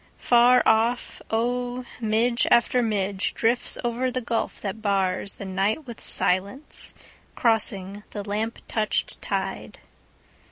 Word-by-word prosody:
Far 245 Hz, +1 st, +5 dB
off, 230 Hz, +2 st, +2 dB
oh, 245 Hz, +2 st, -1 dB
midge 235 Hz, +2 st, +2 dB
after 245 Hz, +1 st, +4 dB
midgeDrifts 210 Hz, +2 st, 0 dB
over 240 Hz, +2 st, 0 dB
the 255 Hz, 0 st, -2 dB
gulf 230 Hz, -1 st, -2 dB
that 200 Hz, +1 st, -3 dB
barsThe 195 Hz, -1 st, -1 dB
night 195 Hz, +9 st, 0 dB
with 235 Hz, -2 st, -9 dB
silence, 200 Hz, +11 st, -1 dB, 0.4 s
crossing 205 Hz, -4 st, +1 dB
the 205 Hz, -1 st, -6 dB
lamp 215 Hz, +3 st, -2 dB
touched 215 Hz, -1 st, -1 dB
tide. -, -, -3 dB
225 Hz, 110 wpm, -25 LUFS, 200-245 Hz, 0.4 s, Far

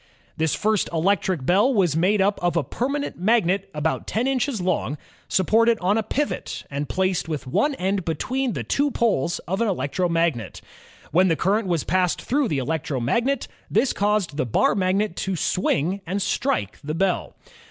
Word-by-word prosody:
This 160 Hz, -1 st, 0 dB
first 215 Hz, -2 st, +1 dB
electric 175 Hz, -3 st, +1 dB
bell 200 Hz, -, +4 dB
was 185 Hz, -, +2 dB
made 190 Hz, +5 st, +3 dB
up 200 Hz, +1 st, +1 dB
of 175 Hz, -1 st, +1 dB
a 165 Hz, -, +2 dB
permanent 275 Hz, -, -3 dB
magnet 195 Hz, -1 st, +2 dB
about 155 Hz, -1 st, -2 dB
ten 225 Hz, +4 st, 0 dB
inches 270 Hz, -2 st, 0 dB
long, 165 Hz, -7 st, -1 dB, 0.3 s
supported 225 Hz, +5 st, +3 dB
on 190 Hz, +3 st, +2 dB
a 225 Hz, -, +2 dB
pivot, 285 Hz, +7 st, -3 dB
and 140 Hz, +1 st, -3 dB
placed 185 Hz, -3 st, 0 dB
with 150 Hz, -4 st, -3 dB
one 285 Hz, -, +1 dB
end 190 Hz, -2 st, -1 dB
be 165 Hz, -1 st, -1 dB
tween 260 Hz, -, -1 dB
the -, -, -3 dB
two 285 Hz, +1 st, +1 dB
poles 205 Hz, -, 0 dB
of 190 Hz, +5 st, -1 dB
an 230 Hz, -, +2 dB
electric 180 Hz, 0 st, -1 dB
magnet. 165 Hz, -, 0 dB, 0.5 s
When 185 Hz, +3 st, +4 dB
the 165 Hz, -, +2 dB
current 195 Hz, +7 st, +1 dB
was 170 Hz, -5 st, 0 dB
passed 180 Hz, 0 st, +1 dB
through 280 Hz, +1 st, 0 dB
the 150 Hz, -, -1 dB
electromagnet, 150 Hz, -, -1 dB, 0.2 s
this 270 Hz, -, +2 dB
caused 200 Hz, -7 st, 0 dB
the 140 Hz, -, +1 dB
bar 110 Hz, -, +3 dB
magnet 195 Hz, 0 st, 0 dB
to 190 Hz, -1 st, -2 dB
swing 180 Hz, +2 st, 0 dB
and 190 Hz, +4 st, -1 dB
strike 195 Hz, -, -1 dB
the 155 Hz, +2 st, -3 dB
bell. 185 Hz, +1 st, 0 dB
185 Hz, 175 wpm, -23 LUFS, 160-215 Hz, 0.5 s, bell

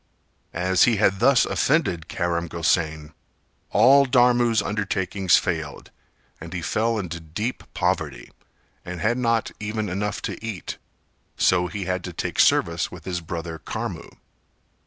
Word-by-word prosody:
As 90 Hz, +2 st, +3 dB
he 120 Hz, -, +3 dB
had 100 Hz, -2 st, +2 dB
thus 125 Hz, +3 st, +5 dB
offended 110 Hz, -, 0 dB
Karam 85 Hz, 0 st, -2 dB
Gosain, 80 Hz, -2 st, -1 dB, 0.6 s
all 135 Hz, +6 st, +6 dB
Dharmu's 120 Hz, -2 st, +4 dB
undertakings 100 Hz, -2 st, +1 dB
failed 80 Hz, -4 st, -4 dB, 0.5 s
and -, -, -9 dB
he -, -, -4 dB
fell 115 Hz, +1 st, 0 dB
into 85 Hz, -4 st, -4 dB
deep 85 Hz, +10 st, -4 dB
poverty, -, -, -2 dB, 0.5 s
and 90 Hz, 0 st, -6 dB
had 115 Hz, +8 st, +1 dB
not 115 Hz, -2 st, +1 dB
even 105 Hz, 0 st, -3 dB
enough 100 Hz, +3 st, -2 dB
to -, -, -5 dB
eat, 110 Hz, -5 st, -5 dB, 0.6 s
so 90 Hz, -1 st, +3 dB
he 95 Hz, +3 st, -5 dB
had 90 Hz, -1 st, -2 dB
to 90 Hz, -, -6 dB
take -, -, -4 dB
service 85 Hz, 0 st, +3 dB
with 85 Hz, -3 st, -11 dB
his 90 Hz, -2 st, -3 dB
brother 85 Hz, 0 st, -6 dB
Karmu. -, -, -5 dB
95 Hz, 135 wpm, -24 LUFS, 85-110 Hz, 0.6 s, all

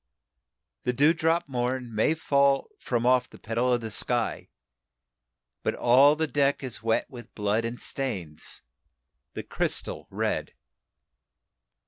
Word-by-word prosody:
"The 125 Hz, -, 0 dB
dewdrop 160 Hz, +4 st, +2 dB
morn 125 Hz, -2 st, -2 dB
may 110 Hz, +9 st, +2 dB
fall 140 Hz, -3 st, +2 dB
from 120 Hz, -1 st, -1 dB
off 125 Hz, 0 st, +3 dB
the -, -, -14 dB
petal 120 Hz, +3 st, -1 dB
of 120 Hz, -1 st, +1 dB
the 110 Hz, -1 st, -5 dB
sky, -, -, 0 dB, 1.1 s
But -, -, -1 dB
all 135 Hz, +5 st, +5 dB
the 160 Hz, +1 st, 0 dB
deck 140 Hz, -2 st, +1 dB
is 125 Hz, -3 st, -6 dB
wet 115 Hz, 0 st, 0 dB
with 120 Hz, -2 st, -12 dB
blood 105 Hz, +2 st, 0 dB
and 115 Hz, +1 st, -5 dB
stains 95 Hz, -, -4 dB, 0.7 s
the -, -, -4 dB
crystal -, -, -3 dB
red. -, -, -2 dB
125 Hz, 125 wpm, -27 LUFS, 115-140 Hz, 1.1 s, all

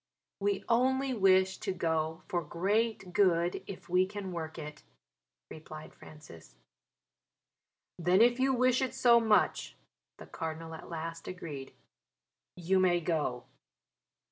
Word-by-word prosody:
"We 200 Hz, -1 st, -1 dB
only 260 Hz, +3 st, +2 dB
wish 190 Hz, -3 st, +3 dB
to -, -, -2 dB
go 160 Hz, -2 st, -2 dB
for 175 Hz, -4 st, -1 dB
great 195 Hz, +4 st, -1 dB
good, 175 Hz, -3 st, +2 dB
if 195 Hz, -, -9 dB
we 180 Hz, +1 st, +2 dB
can 200 Hz, -1 st, -6 dB
work 160 Hz, -2 st, -6 dB
it," 150 Hz, -1 st, -8 dB, 0.7 s
replied 155 Hz, 0 st, -10 dB
Francis. 150 Hz, -, -14 dB, 1.4 s
"Then 180 Hz, +3 st, +3 dB
if 240 Hz, +2 st, +4 dB
you 265 Hz, +1 st, +3 dB
wish 255 Hz, 0 st, +2 dB
it 260 Hz, -1 st, -2 dB
so 240 Hz, -2 st, +5 dB
much," 220 Hz, -2 st, +1 dB, 0.4 s
the -, -, -11 dB
Cardinal 165 Hz, 0 st, -6 dB
at 160 Hz, -, -10 dB
last 165 Hz, 0 st, -6 dB
agreed, 150 Hz, -7 st, -7 dB, 0.8 s
"you 185 Hz, +2 st, +1 dB
may 180 Hz, -2 st, +3 dB
go." 150 Hz, -7 st, -2 dB
180 Hz, 125 wpm, -31 LUFS, 160-210 Hz, 1.4 s, so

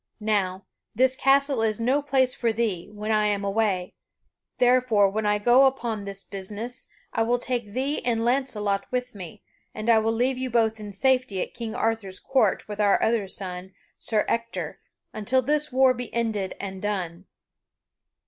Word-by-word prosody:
Now, 200 Hz, -3 st, -1 dB, 0.3 s
this 260 Hz, +3 st, +3 dB
castle 275 Hz, -1 st, +3 dB
is 220 Hz, -1 st, 0 dB
no 260 Hz, +5 st, +2 dB
place 265 Hz, -3 st, +2 dB
for 235 Hz, -2 st, 0 dB
thee, 210 Hz, -5 st, -2 dB
when 210 Hz, +1 st, -4 dB
I 215 Hz, -1 st, +3 dB
am 200 Hz, -1 st, -1 dB
away, 195 Hz, -3 st, 0 dB, 0.6 s
therefore, 245 Hz, -5 st, +4 dB
when 215 Hz, +1 st, -1 dB
I 210 Hz, 0 st, +3 dB
go 245 Hz, +5 st, +5 dB
upon 230 Hz, -6 st, -2 dB
this 195 Hz, 0 st, -5 dB
business, 210 Hz, +5 st, -6 dB, 0.3 s
I 225 Hz, -, 0 dB
will 235 Hz, +2 st, +2 dB
take 240 Hz, -4 st, -3 dB
thee 275 Hz, +4 st, -1 dB
and 230 Hz, -2 st, 0 dB
Launcelot 210 Hz, -6 st, 0 dB
with 250 Hz, 0 st, -2 dB
me, 185 Hz, -6 st, -10 dB, 0.3 s
and 215 Hz, +2 st, +1 dB
I 225 Hz, -, +6 dB
will 220 Hz, +1 st, +1 dB
leave 250 Hz, +3 st, 0 dB
you 260 Hz, 0 st, -2 dB
both 225 Hz, -2 st, +1 dB
in 210 Hz, -1 st, -7 dB
safety 255 Hz, -1 st, +1 dB
at -, -, -10 dB
King 230 Hz, -1 st, -5 dB
Arthur's 225 Hz, -6 st, -1 dB
court 255 Hz, -7 st, +1 dB
with 210 Hz, 0 st, -3 dB
our 200 Hz, -1 st, +4 dB
other 220 Hz, -3 st, +1 dB
son, 185 Hz, -1 st, -6 dB, 0.2 s
Sir 215 Hz, -2 st, 0 dB
Ector, 230 Hz, 0 st, -3 dB, 0.3 s
until 250 Hz, +5 st, +1 dB
this 300 Hz, +3 st, +1 dB
war 260 Hz, 0 st, +5 dB
be 245 Hz, -1 st, -6 dB
ended 220 Hz, -5 st, -1 dB
and 190 Hz, -1 st, -6 dB
done." 185 Hz, -3 st, -3 dB
225 Hz, 170 wpm, -25 LUFS, 205-250 Hz, 0.6 s, I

